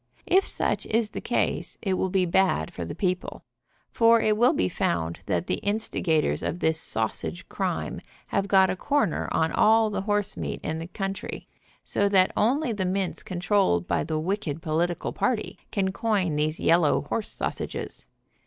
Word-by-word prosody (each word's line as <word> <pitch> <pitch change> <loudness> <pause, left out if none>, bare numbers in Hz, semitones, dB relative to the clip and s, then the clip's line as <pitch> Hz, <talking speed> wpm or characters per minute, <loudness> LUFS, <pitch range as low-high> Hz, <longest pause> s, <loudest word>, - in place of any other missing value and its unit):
If 380 +2 +3
such - - 0
is 220 -1 +1
the - - -5
case - - -1
it 195 -3 -1
will 185 0 0
be 185 -1 +2
bad 185 0 +1
for - - -5
the 150 - -6
peo 180 +1 +2
ple, 185 - -10 0.5
for 230 0 +5
it 215 -1 +2
will 240 +3 +4
be 90 - +1
found 85 -2 -1
that 85 -1 0
the - - -1
instigators 165 - 0
of - - -2
this 160 -2 +1
sausage 110 -7 -3
crime - - -3 0.2
have 195 - -1
got 190 -1 +5
a - - -2
corner 250 - 0
on 160 0 +1
all 220 0 +4
the 200 - -2
horse 205 0 0
meat - - -4
in 160 +1 -2
the 165 - -6
country, 195 +1 -5 0.4
so 200 0 +1
that 190 -2 +4
only 250 +3 +2
the 205 -3 -2
mints 185 0 -1
controlled 180 - +1
by - - +1
the 155 0 -2
wicked 160 -2 -2
political 170 +2 -1
party 240 -4 -1
can 190 -2 0
coin 200 -6 0
these 155 +2 0
yellow 165 -2 +3
horse 210 +9 -3
sausages. - - -5
190 Hz, 175 wpm, -26 LUFS, 160-210 Hz, 0.5 s, for